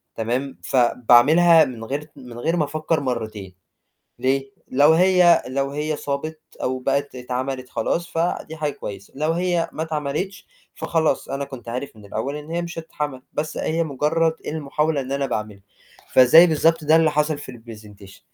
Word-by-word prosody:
تمام، 125 +4 -3
فباعملها 135 +7 +5
من 120 -3 -7
غير 140 +6 -3
ت 150 - -20
من 120 -1 -11
غير 165 +7 0
ما 150 - +2
أفكّر 155 +2 -1
مرّتين، 110 -8 -4 0.6
ليه؟ 135 +2 0 0.2
لو 145 +4 +5
هي 180 0 +5
لو 135 +1 -1
هي 150 +1 -2
صابت 155 +3 -4 0.2
أو 130 0 -1
بقت 140 +2 -1
اتعملت 130 +1 -4
خلاص، 170 +9 -1
فدي 165 -1 -2
حاجة 150 -2 -2
كويسة 100 -5 -9
لو 155 +2 +1
هي 175 -1 0
ما 155 - -3
اتعملتش، 160 +5 -4 0.3
فخلاص 160 -2 0
أنا 135 +1 -3
كنت 130 -4 -10
عارف 125 +2 -5
من 105 -1 -14
الأول 110 +8 -4
إن 150 +2 -8
هي 170 +1 -1
مش 170 -1 -6
هتتعمل 150 -4 -5
بس 155 +1 -3
أهي 165 +1 0
مجرّد 160 +3 +1
المحاولة 150 0 -1
إن 130 +1 -7
أنا 140 0 0
باعملها، 110 -5 -4 0.5
فزي 130 +7 +8
بالضبط 165 0 +2
ده 155 +2 +4
اللي 160 -1 +4
حصل 150 0 0
في 145 - -9
الPresentation 105 -4 -13
145 Hz, 165 wpm, -22 LUFS, 125-160 Hz, 0.6 s, فزي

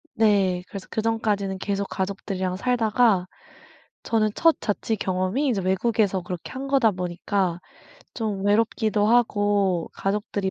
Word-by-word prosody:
네. 195 -5 +2
그래서 195 -2 -8
그전까지는 215 -3 -1
계속 200 0 -2
가족들이랑 190 -1 -3
살다가 225 -4 +2 0.8
저는 220 -2 +1
첫 330 -1 +4
자취 220 +2 -1
경험이 185 +9 -1
이제 210 -6 0
외국에서 195 +1 +1
그렇게 175 -1 -7
한 265 +1 -5
거다 270 -5 +3
보니까 180 0 -2 0.6
좀 210 -4 -3
외롭기도 215 0 +2
하고 205 -6 +2
가족들이 200 -1 -2
205 Hz, 305 characters per minute, -24 LUFS, 190-225 Hz, 0.8 s, 첫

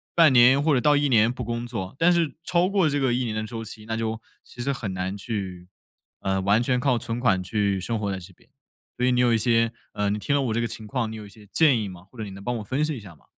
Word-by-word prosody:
半 165 -4 +6
年 130 +3 +6
或 150 0 +2
者 125 - +2
到 145 -1 +4
1 145 0 +2
年 115 -1 +4
不 125 0 -6
工 120 +1 -3
作， 110 -3 -5
但 170 +2 +4
是 165 -5 +1
超 175 +1 +2
过 190 -6 +2
这 145 0 0
个 130 -3 +1
1 125 +1 0
年 110 -2 -3
的 110 - -2
周 115 0 -6
期， 110 0 -10
那 115 0 -3
就 110 0 -3 0.2
其 120 - -10
实 140 +3 0
很 105 -7 -4
难 95 +1 -3
去， 95 -4 -5 0.5
呃， 95 0 0
完 100 +4 +3
全 125 0 +1
靠 125 -2 +2
存 115 0 -4
款 100 -7 +2
去 100 0 0
生 115 +4 -2
活 100 -2 -2
在 95 - -3
这 95 +1 -13
边。 - - -27 0.5
所 125 - +1
以 125 - +3
你 125 - +3
有 120 -1 +4
一 - - +4
些 115 0 +2 0.2
呃， 105 0 0
你 105 +1 -1
听 140 +8 0
了 140 - +2
我 120 -4 -1
这 115 - 0
个 115 - 0
情 110 0 -7
况 115 0 -2
你 110 - -7
有 105 -1 -8
一 - - -12
些 105 0 -17
建 140 -8 +4
议 105 - -3
吗？ 90 -2 -10
或 125 - -18
者 110 - -4
你 100 - -8
能 100 +1 -10
帮 120 +1 -2
我 - - -5
分 130 +8 -1
析 155 -3 -1
一 - - -7
下 95 -6 -12
吗？ - - -26
115 Hz, 320 characters per minute, -25 LUFS, 105-130 Hz, 0.5 s, 半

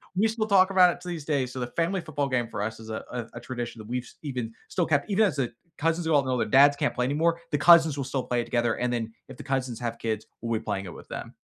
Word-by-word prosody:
We 205 +4 +3
still 220 -1 -2
talk 190 -2 +5
about 180 -2 +6
it - - -14
to 180 - -7
these 165 -4 -5
day, 140 -4 +1
so 125 +1 -7
the 120 - -2
family 175 +3 +1
football 145 -4 -2
game 120 -3 0
for 105 -2 -5
us 110 +1 -4
is 110 0 -10
a 110 - -4
a 125 -2 -4
a - - -5
tradition 120 -2 -5
that 110 - -9
we've 125 0 -3
even 125 -6 -4 0.2
still 175 - 0
kept 145 +5 +1
even 215 +3 +4
as 170 -8 0
the 125 -3 0 0.3
cousins 165 +2 0
are 160 - +2
all 145 -2 +5
grown, 130 -1 0
their - - 0
dads 140 +4 +6
can't 145 - 0
play 125 - 0
anymore, 165 +5 +1
the 145 - +2
cousins 160 -2 +6
will 135 - -2
still 135 -1 -2
play 125 - -1
it - - -5
together, 120 -1 +1
and 125 0 -1
then 115 -1 -2 0.2
if 130 - -10
the - - -8
cousins 130 -3 -2
have 115 -1 -3
kids, 110 -1 -2 0.2
we'll 115 -1 -1
be - - -14
playing 95 0 -3
it 85 - -8
with - - -13
them. - - -6
135 Hz, 300 wpm, -27 LUFS, 120-165 Hz, 0.3 s, about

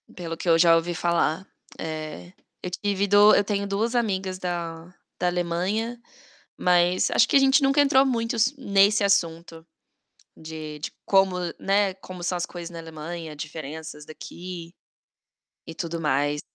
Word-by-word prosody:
Pelo 170 -2 -6
o - - -20
que 175 - -3
eu 165 - +6
já 165 0 +6
ouvi 165 +1 0
falar, 170 +1 0 0.3
eh, 155 - -6 0.3
eu 180 - -4
tive 200 +2 -1
do 205 +1 +7
eu 205 - +4
tenho 200 -1 -2
2 220 +5 -1
amigas 190 -5 -1
da 170 -1 -5 0.3
da 180 - +1
Alemanha, 180 +7 -1 0.6
mas 180 0 +2
acho - - +4
que - - +2
a - - +10
gente 270 +1 +4
nunca 275 +2 +3
entrou 275 -1 +5
muito 235 -1 -1
s 240 +5 +2
nesse 200 -3 +3
assunto 170 -4 0 0.7
de 155 -1 -8
de 150 - -5
como, 195 -2 +3 0.2
né, 195 0 +1
como 185 -2 -10
são 180 +1 -1
as 175 - -2
coisas 175 -1 -8
na 170 - -8
Alemanha, 165 0 -7
diferenças 155 0 -8
daqui 170 +2 -9 0.9
e 165 - -8
tudo 170 0 -4
mais. 145 -1 0
175 Hz, 160 wpm, -25 LUFS, 165-200 Hz, 0.9 s, a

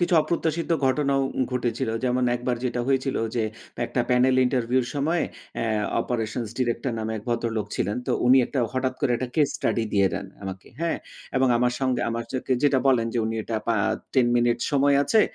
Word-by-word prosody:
কিছু 175 0 +2
অপ্রত্যাশিত 165 0 -1 0.2
ঘটনাও 135 0 +2 0.3
ঘটেছিল। 125 0 -1 0.2
যেমন 125 0 +1
একবার 125 0 -2
যেটা 125 -1 -1
হয়েছিল 135 0 +1 0.2
যে 120 - +1 0.4
একটা 120 +1 -1
panel 125 +1 +4
ইন্টারভিউ 125 0 +1
এর - - -6
সময় 155 +4 +1 0.3
অ্যা 115 - -1 0.3
operations 115 -1 -2
director 120 0 0
নামে 110 0 -3
এক 105 - -7
ভদ্রলোক 115 -3 -1
ছিলেন। 100 +3 -1
তো - - +1
উনি 130 +2 +7 0.4
হঠাৎ 130 0 0
করে 140 -4 +1
একটা 130 +1 -3
case 150 -3 +2
study 115 - 0
দিয়ে 100 -1 +4
দেন 100 - -4 0.2
আমাকে 95 -1 -7
হ্যাঁ? 170 0 0 0.4
এবং 130 0 +3
আমার 125 +1 +2
সঙ্গে 130 -2 +1
আমার 115 0 -3
যাকে, 130 0 -1
যেটা 140 -2 +4
বলেন 120 -4 +3
যে - - +1
উনি 110 0 -2
এটা 115 +1 -3
পা 115 - +2 0.4
10 130 -3 +4
মিনিট 120 0 +2
সময় 140 -1 +4
আছে। 180 +10 +4
125 Hz, 185 wpm, -25 LUFS, 115-135 Hz, 0.4 s, উনি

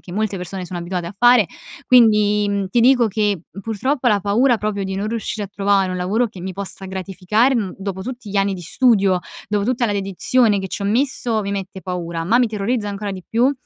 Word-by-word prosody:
che 175 - -12
molte 210 -1 -1
persone 180 +1 -6
sono 175 0 -6
abituate 175 0 -4
a 175 - -8
fare, 240 -1 +5 0.4
quindi, 210 -4 +4
mhmm, 200 -1 -1
ti 235 +6 +2
dico 245 -1 +5
che 205 -4 0 0.2
purtroppo 245 +4 0
la 205 -3 +2
paura 230 +6 +3
proprio 210 -2 -2
di 190 0 -4
non 200 +2 -2
riuscire 220 -2 -3
a - - -21
trovare 200 -2 +1
un 185 - -3
lavoro 200 +7 0
che 195 -4 -12
mi 185 +1 -5
possa 195 0 -5
gratificare, 190 +6 0
mhmm, 210 -6 -2
dopo 190 -1 -5
tutti 245 -1 -7
gli 200 - -3
anni 195 0 +1
di 180 - -8
studio, 200 -3 +3 0.3
dopo 205 -1 0
tutta 245 +1 0
la 210 - -1
dedizione 205 +3 +2
che 190 0 -4
ci 180 - -5
ho - - -2
messo, 235 -1 +1
mi 200 - -4
mette 195 -1 -5
paura, 170 -3 -4
ma 225 +7 +3
mi 250 - +4
terrorizza 210 +1 -2
ancora 200 0 -4
di 185 -1 -8
più 245 +5 +2
205 Hz, 225 wpm, -20 LUFS, 190-230 Hz, 0.4 s, fare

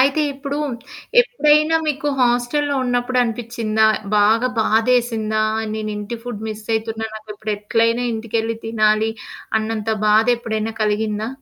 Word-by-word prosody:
అయితే 275 +4 +3
ఇప్పుడు, 280 +1 -5 0.6
ఎప్పుడైనా 305 -9 +3
మీకు 295 0 -1
హోస్టలులో 250 +4 +1
ఉన్నప్పుడు 245 0 0
అనిపిచ్చిందా 230 -2 -1 0.3
బాగా 220 +4 +4
బాధేసిందా? 220 -1 +1 0.3
నేను 215 -1 -3
ఇంటి 210 +3 -5
ఫుడ్ 240 -4 -6
మిస్ 215 0 -7
అయితున్నా 225 0 -2
నాకు 215 0 -10
ఇప్పుడు 215 +1 -4
ఎట్లైనా 230 +3 +1
ఇంటికెళ్లి 225 0 -2
తినాలి 215 0 +2 0.5
అన్నంత 220 0 -3 0.2
బాధ 215 +1 +4
ఎప్పుడైనా 225 -1 -3
కలిగిందా? 215 0 -1
225 Hz, 120 wpm, -20 LUFS, 215-245 Hz, 0.6 s, బాగా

